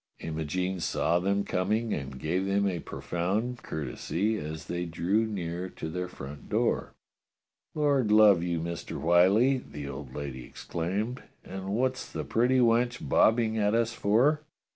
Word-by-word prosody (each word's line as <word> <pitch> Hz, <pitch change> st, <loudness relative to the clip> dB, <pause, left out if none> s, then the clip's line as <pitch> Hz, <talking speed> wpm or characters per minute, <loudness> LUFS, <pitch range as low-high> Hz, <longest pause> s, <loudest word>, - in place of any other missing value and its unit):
Imogene 80 Hz, +4 st, -2 dB
saw 85 Hz, 0 st, +1 dB
them 100 Hz, +2 st, +1 dB
coming 110 Hz, +6 st, 0 dB
and 70 Hz, -2 st, -5 dB
gave 90 Hz, +7 st, -1 dB
them 100 Hz, +1 st, +2 dB
a 90 Hz, -3 st, -1 dB
profound 105 Hz, +11 st, -2 dB
courtesy 85 Hz, -, -2 dB
as 80 Hz, -4 st, -5 dB
they 85 Hz, 0 st, -3 dB
drew 95 Hz, +7 st, 0 dB
near 90 Hz, -3 st, -4 dB
to 80 Hz, -, -6 dB
their 90 Hz, +2 st, -3 dB
front 70 Hz, -4 st, -9 dB
door. -, -, 0 dB, 0.8 s
"Lord 140 Hz, -7 st, +2 dB
love 105 Hz, -4 st, +7 dB
you. 85 Hz, -1 st, -1 dB
Mister 85 Hz, +1 st, -5 dB
Whyllie," 100 Hz, +10 st, +4 dB
the 75 Hz, -, -8 dB
old 65 Hz, -2 st, -7 dB
lady 70 Hz, -3 st, -5 dB
ex -, -, -11 dB
claimed, 100 Hz, +10 st, -2 dB, 0.2 s
"and 95 Hz, +1 st, -5 dB
what's 130 Hz, +2 st, -1 dB
the -, -, -3 dB
pretty 125 Hz, +3 st, +2 dB
wench 120 Hz, 0 st, +2 dB
bobbing 110 Hz, -1 st, +3 dB
at 105 Hz, +1 st, +2 dB
us 115 Hz, 0 st, +1 dB
for?" 125 Hz, +10 st, +3 dB
95 Hz, 150 wpm, -28 LUFS, 85-110 Hz, 0.8 s, love